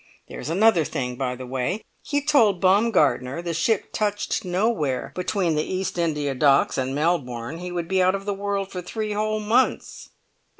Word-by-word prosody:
There's - - -6
another 190 0 +4
thing, 125 -3 -3
by 125 0 -2
the 130 +1 -8
way! 130 - -2 0.2
He 285 -1 -1
told 225 -11 +4
Baumgartner 170 - +2
the 170 -1 -3
ship 190 +6 0
touched 205 -1 -1
nowhere 180 - -1
between 180 -2 0
the 150 - +1
East 185 +2 -3
India 150 -4 0
Docks 135 +1 +3
and 130 +1 -2
Melbourne; 145 -4 -1
he 180 0 -6
would 175 -2 -3
be 190 +1 +2
out 185 +1 +3
of 195 0 -6
the 205 - -1
world 200 0 -3
for 180 - -5
three 215 +4 -4
whole 215 +1 -1
months." 225 +5 0
180 Hz, 175 wpm, -24 LUFS, 145-205 Hz, 0.2 s, another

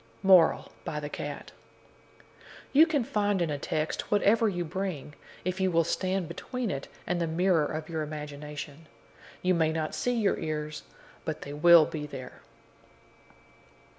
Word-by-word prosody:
MORAL, 185 -4 +5
BY 150 - -3
THE 145 -1 -5
CAT 145 -1 -6 1.2
You 310 +4 +7
can 290 -5 +1
find 205 -3 0
in 170 -3 0
a 145 - -3
text 155 +2 -2
whatever 210 +2 +4
you 175 -3 -2
bring, 165 -4 -4 0.3
if 185 +1 -2
you 190 - +3
will 165 -1 +3
stand 185 +2 -1
between 250 - -4
it 135 - -4 0.2
and 175 -1 -1
the 165 - 0
mirror 165 -1 +2
of 155 0 -5
your 160 -2 -3
imagination. 150 0 -7 0.6
You 185 0 +3
may 160 -2 +2
not 160 -1 -2
see 245 0 0
your 205 -3 +1
ears, 155 -1 -4 0.4
but - - -4
they 145 - -7
will 165 +1 +7
be 150 -1 -5
there. 130 -3 -9
165 Hz, 155 wpm, -29 LUFS, 150-190 Hz, 1.2 s, You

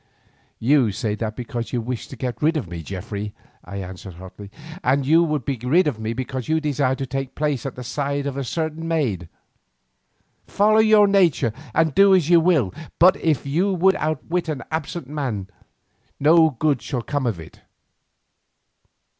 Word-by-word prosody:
"You 130 -2 +3
say 105 +1 -2
that 110 0 -4
because 120 -1 -5
you 125 - -1
wish 120 -1 -4
to 135 - -10
be 130 - -2
rid 160 +2 +2
of 135 - -3
me, 85 -1 -6
Geoffrey," 100 +4 -6 0.3
I 100 - -9
answered 95 -1 -8
hotly, 95 +3 -11 0.3
"and 135 +1 +2
you 165 +4 +5
would 150 -6 -1
be 135 -4 -2
rid 165 +9 +3
of 140 -8 -2
me 110 0 -3
because 130 0 -4
you 160 0 +2
desire 140 -3 0
to 135 - -4
take 135 0 -4
my - - -42
place 145 -4 -1
at 135 - -7
the 125 - -7
side 140 +2 -2
of 140 -2 -3
a 140 - -2
certain 160 +4 -3
maid. 115 - -1 1.2
Follow 215 +2 +3
your 215 -1 +6
nature 175 - +3 0.2
and 160 -2 +2
do 195 +2 +6
as 175 -3 +1
you 170 - +7
will, 160 - +2 0.2
but 185 +3 +6
if 155 -5 0
you 170 +8 +1
would 190 +2 +4
outwit 160 +3 -2
an 150 -4 -3
absent 160 -1 -4
man 130 -10 -3 0.7
no 160 +2 +5
good 145 -1 0
shall 120 +1 -4
come 145 0 -2
to - - +2
you - - -1
of 85 - -13
it." 80 - -13
140 Hz, 190 wpm, -22 LUFS, 115-160 Hz, 1.2 s, you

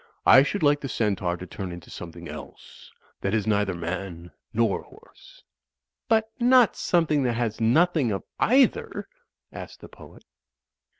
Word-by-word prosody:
I 130 - +8
should 160 +6 -1
like 145 0 +4
the 135 - -5
Centaur 95 -6 -1
to 90 - -8
turn 95 0 -7
into 85 -1 -10
something 85 -2 -9
else, - - -11 0.3
that 100 +2 -1
is 105 - 0
neither 105 -3 +1
man 85 0 -6 0.2
nor - - +1
horse." - - -19 0.6
"But 220 0 +2
not 245 -1 +5
something 160 -4 +1
that 125 -2 0
has 115 -1 -2
nothing 145 +2 +3
of 100 - -3 0.2
either?" 260 +2 +2 0.5
asked - - -9
the - - -12
poet. - - -16
115 Hz, 145 wpm, -25 LUFS, -, 0.6 s, I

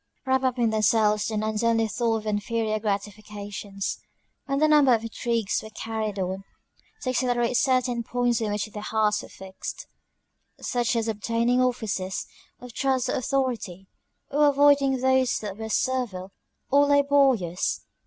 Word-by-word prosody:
Wrapped 265 0 +1
up 255 -1 +1
in 235 -2 +2
themselves, 215 -1 +2
the 220 - -2
nuns 215 +1 -1
only 225 -1 +2
thought 230 +1 0
of 220 - -8
inferior 215 +1 -1
gratifications. 205 -1 -4 0.5
And 275 0 0
a - - +6
number 290 -5 +5
of 225 - -4
intrigues 230 -2 -1
were 220 - -10
carried 220 -1 -4
on 190 +1 -3 0.6
to 255 - -1
accelerate 245 -1 0
certain 255 -2 +2
points 245 0 0
on 215 -2 -1
which 205 0 -1
their 215 -1 -8
hearts 210 -1 +1
were - - -12
fixed: 190 0 -8 0.7
Such 240 -1 -1
as 230 -1 0
obtaining 230 +3 +1
offices 220 -7 -1 0.3
of 250 -1 -11
trust 260 -1 0
or - - 0
authority; 250 -9 -2 0.5
or 295 +1 +4
avoiding 280 -1 +4
those 260 0 +2
that 205 -1 -6
were 220 0 -5
servile 220 -7 -1 0.4
or 285 +1 +5
laborious. 275 -11 +2
230 Hz, 150 wpm, -25 LUFS, 210-255 Hz, 0.7 s, a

